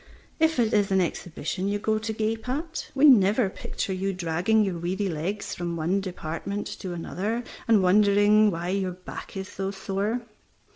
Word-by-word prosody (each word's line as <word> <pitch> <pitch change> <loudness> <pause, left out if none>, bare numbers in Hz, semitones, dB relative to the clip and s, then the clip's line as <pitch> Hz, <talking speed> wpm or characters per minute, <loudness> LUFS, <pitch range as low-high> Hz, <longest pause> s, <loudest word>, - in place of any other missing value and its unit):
If 320 -1 +3
it 230 -3 +2
is 205 -2 +2
an 190 - +4
exhibition 175 +1 -2
you 205 +1 0
go 215 +1 0
to 220 0 -3
gape 220 +2 -2
at, 320 +5 -3
we 275 +2 +5
never 215 -5 +5
picture 190 - -4
you 195 +1 -1
dragging 180 +5 +1
your 185 -4 -2
weary 190 +4 -1
legs 180 +5 -3
from 175 -1 -3
one 170 +5 0
department 185 +2 -4
to 185 -2 -5
another, 205 +7 -3 0.2
and 220 -4 +5
wondering 205 +2 +5
why 175 -1 -3
your 190 -1 -1
back 180 +2 -9
is 190 0 -4
so 195 0 -4
sore. 195 +4 -2
195 Hz, 175 wpm, -26 LUFS, 180-215 Hz, 0.2 s, we